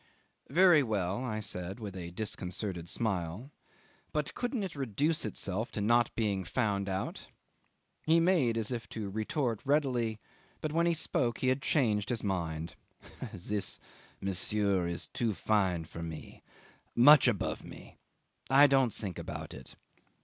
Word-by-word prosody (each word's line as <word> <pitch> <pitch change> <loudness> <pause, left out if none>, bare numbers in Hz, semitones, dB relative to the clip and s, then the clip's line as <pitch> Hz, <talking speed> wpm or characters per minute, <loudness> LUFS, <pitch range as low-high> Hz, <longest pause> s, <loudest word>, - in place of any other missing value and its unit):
"Very 170 +1 +6
well," 105 -2 -1
I 110 -4 -2
said, 95 0 -5
with 105 -4 -6
a 85 -2 -6
disconcerted 90 -2 -4
smile; 100 - -2 0.6
"but 150 -1 -2
couldn't 245 -3 -2
it 185 -5 -5
reduce 140 +4 0
itself 105 +1 -3
to - - -3
not 120 +3 +3
being 100 -4 0
found 100 0 -1
out?" 95 0 -4 0.8
He 165 +1 +6
made 165 -10 +3
as 110 0 0
if 120 -2 -4
to 105 -3 -5
retort 115 +2 -1
readily, 130 -6 +1 0.4
but 155 - -3
when 170 +1 +3
he 170 - +2
spoke 125 -6 0
he 130 - +1
had 130 +2 +1
changed 110 -9 +1
his 120 -2 -1
mind. 85 -4 -2 0.6
"This, 100 +3 -3 0.4
monsieur, 100 -1 +1
is 85 -2 -4
too 115 -4 -2
fine 95 -3 +1
for 85 +1 -8
me 80 -1 -8 0.5
much 140 +3 +8
above 110 -6 0
me - - -12 0.5
I 135 +3 +8
don't 135 -4 +4
think 95 -5 -4
about - - -6
it." 65 0 -11
110 Hz, 145 wpm, -31 LUFS, 95-135 Hz, 0.8 s, much